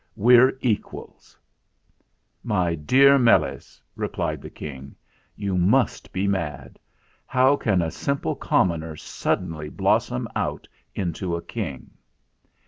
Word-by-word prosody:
We're 125 +4 +5
equals." 115 -5 -4 1.1
"My 95 -7 0
dear 135 - +5
Meles," 120 -2 +1 0.2
replied - - -3
the - - -9
King. 70 -2 -9 0.4
"You 100 -2 -3
must 100 +9 +1
be 95 +1 -1
mad. 85 -8 -3 0.5
How 130 +2 +4
can 100 -10 +1
a 80 - -2
simple 140 0 -2
commoner 80 -3 0
suddenly 75 0 -3
blossom 60 - 0
out - - -3 0.3
into 90 -1 -2
a 85 - -4
King?" 85 - -6
95 Hz, 110 wpm, -24 LUFS, 80-120 Hz, 1.1 s, We're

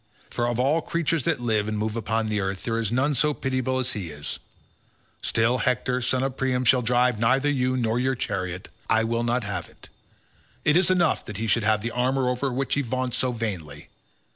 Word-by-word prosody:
for 120 - -1
of 120 0 -1
all 145 +6 +2
creatures 165 -3 -1
that - - +1
live 110 -3 0
and 110 0 -2
move 110 +1 -2
upon 110 0 -1
the 105 -1 0
earth 95 -1 -3
there 115 0 -1
is 110 -2 -1
none 135 +5 +2
so 150 +2 +1
pitiable 130 -1 -1
as 130 0 0
he 100 -8 -4
is—still, 115 +9 -4
Hector 125 +1 0
son 130 +2 +1
of 135 -1 -2
Priam 130 -1 0
shall 125 +2 +5
drive 125 -1 +2
neither 130 +5 +3
you 130 -2 +1
nor 115 -1 +1
your 130 +1 +1
chariot. 95 -5 -3 0.2
I 110 0 +4
will 115 +1 0
not 120 +1 0
have 105 -1 -4
it. - - -19 0.8
It 150 - +4
is 180 0 +5
enough 175 -3 +2
that 105 - -6
he 115 - -2
should 115 +1 +2
have 110 0 +2
the 115 - -2
armour 130 +1 +1
over 125 +2 -1
which 135 +2 -1
he 145 - +2
vaunts 130 -1 -2
so 130 - +1
vainly. 90 -11 -5
125 Hz, 210 wpm, -25 LUFS, 110-130 Hz, 0.8 s, shall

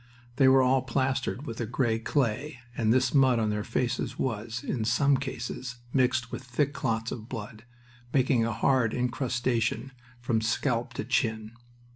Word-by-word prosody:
They 135 - +6
were 130 0 +6
all 130 +1 +3
plastered 130 +1 -1
with 115 0 -5
a 115 - -2
gray 120 -1 0
clay 130 +3 -1 0.2
and 110 -1 +2
this 130 +1 +3
mud 130 -3 +5
on 110 -2 +1
their 105 0 -2
faces 120 +2 -2
was, 115 0 -3
in 120 -5 -2
some 135 +6 +3
cases, 125 -1 -4 0.2
mixed 125 -2 +2
with - - -5
thick 135 +3 0
clots 115 -3 -1
of 115 -1 -7
blood, 110 -2 -7 0.5
making 130 -3 +3
a 115 - 0
hard 115 0 +2
incrustation 125 -1 -1 0.3
from 120 -2 0
scalp 115 +1 -1
to - - -3
chin. 110 -4 0
125 Hz, 160 wpm, -28 LUFS, 115-130 Hz, 0.5 s, They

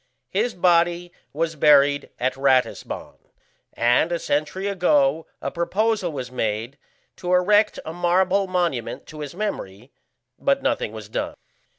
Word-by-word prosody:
His 220 +5 0
body 175 0 +2 0.2
was 165 +2 -2
buried 145 -1 +4
at 130 +1 0
Ratisbon, 135 -2 0 0.6
and 120 +8 +2
a 170 - +1
century 155 +5 -2
ago 160 -6 +2 0.2
a 140 - -2
proposal 190 +2 0
was 130 -4 -6
made 115 +2 -3 0.4
to 180 -1 -4
erect 205 +4 +3
a 160 - -5
marble 185 +3 +2
monument 175 -10 -2
to 155 - -11
his 145 +1 -6
memory, 125 - -5 0.5
but 275 0 +1
nothing 280 - 0
was 110 -2 -9
done. 110 - -3
165 Hz, 130 wpm, -23 LUFS, 135-185 Hz, 0.6 s, buried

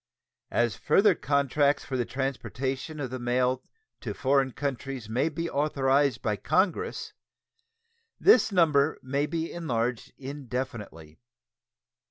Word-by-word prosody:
As 120 -4 +1
further 200 - +4
contracts 140 -1 +1
for 135 - -4
the 125 -2 0
transportation 135 +2 -3
of 130 -4 -4
the 130 - -4
mail 125 +1 +1 0.4
to - - -5
foreign 135 0 +2
countries 135 -3 -4
may 130 +8 +1
be 165 +2 -3
authorized 140 -3 +1
by 105 -3 0
Congress, 185 - 0 1.1
this 235 - +6
number 155 -5 +3
may 140 +3 0
be 165 0 -3
enlarged 125 -8 -2
indefinitely. 125 - -6
135 Hz, 115 wpm, -28 LUFS, 125-150 Hz, 1.1 s, this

